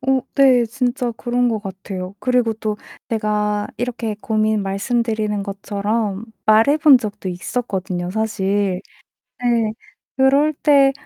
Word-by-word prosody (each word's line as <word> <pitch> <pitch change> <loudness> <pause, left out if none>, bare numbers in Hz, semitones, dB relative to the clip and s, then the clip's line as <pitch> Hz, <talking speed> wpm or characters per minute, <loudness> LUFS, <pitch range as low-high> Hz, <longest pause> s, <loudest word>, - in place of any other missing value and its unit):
어 265 0 +3
네, 255 -3 +5
진짜 245 +1 -1
그런 245 +2 0
것 225 -2 -1
같아요. 190 -1 -6
그리고 250 -2 +1
또 215 -1 -3 0.3
내가 210 -2 0
이렇게 235 -2 -3
고민 215 -1 +1
말씀드리는 215 +1 -1
것처럼 200 +1 -2 0.2
말해 225 +7 +5
본 300 -4 +7
적도 205 -4 -5
있었거든요 185 -2 -3
사실. 200 -3 0 0.6
네. 235 -3 +1 0.4
그럴 275 +3 +4
때 280 -2 +4
220 Hz, 245 characters per minute, -20 LUFS, 205-245 Hz, 0.6 s, 본